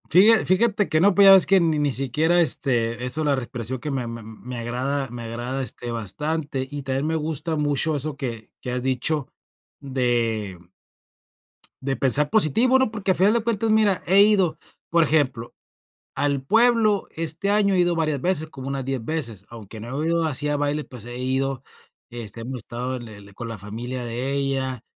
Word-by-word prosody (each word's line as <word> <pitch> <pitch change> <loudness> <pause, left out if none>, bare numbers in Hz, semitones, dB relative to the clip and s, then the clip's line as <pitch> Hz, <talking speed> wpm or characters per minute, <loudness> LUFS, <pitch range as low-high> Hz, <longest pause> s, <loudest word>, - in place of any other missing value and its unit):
Fíja 210 +7 +6
fíjate 205 +1 +2
que 155 - +2
no, 200 +4 +4
pues, 200 - +6
ya - - +10
ves 190 -2 +7
que 195 0 +4
ni 160 -3 +1
ni 145 -1 +1
siquiera, 155 +7 +2
este, 120 -5 +1
eso 125 +5 -3
de - - -1
la 145 -1 +2
respiración 125 -1 -5
que 150 - -5
me 130 -3 -2
me 115 -1 -7
me 115 +3 -9
agrada, 130 +4 -2
me 120 0 -7
agrada, 120 +4 -4
este, 120 -1 -4
bastante, 140 - -3
y 145 0 -6
también 135 +2 -2
me 160 - 0
gusta 160 +1 -2
mucho 150 +1 +1
eso 145 0 -3
que 115 -5 -6
que 125 - -5
has 125 0 -2
dicho 130 +2 0 0.5
de 120 -7 -1 1.2
de 135 0 -2
pensar 145 +2 +2
positivo, 225 - +4
¿no? 260 -4 +1
Porque 205 -3 0
al - - -2
final 195 +4 +4
de 235 -1 +1
cuentas, 225 -1 -1
mira, 215 -3 +3
he 195 +3 +6
ido, 200 -5 +3 0.3
por 170 0 +4
ejemplo, 135 -6 0 0.6
al 140 -2 0
pueblo, 225 - +3
este 165 +4 -2
año 205 -1 +3
he - - +1
ido 175 -1 +2
varias 155 -4 0
veces, 160 -1 0
como 135 -2 -8
unas 135 -1 -3
10 135 -2 -3
veces, 115 - -2
aunque 110 -2 -10
no 125 +7 -4
he - - -1
ido 170 0 +1
así 150 -1 0
a 145 - +1
baile, 145 +1 -1
pues, 125 -5 -11
he 120 0 -4
ido, 130 0 -1 0.5
este, 115 -2 -8
hemos 125 +3 -5
estado 125 +3 -5
en 120 -2 -8
el 100 -2 -11
con 115 +3 -7
la 115 - -5
familia 120 +6 -5
de 120 +3 -2
ella, 135 -3 -1
135 Hz, 195 wpm, -23 LUFS, 120-165 Hz, 1.2 s, ya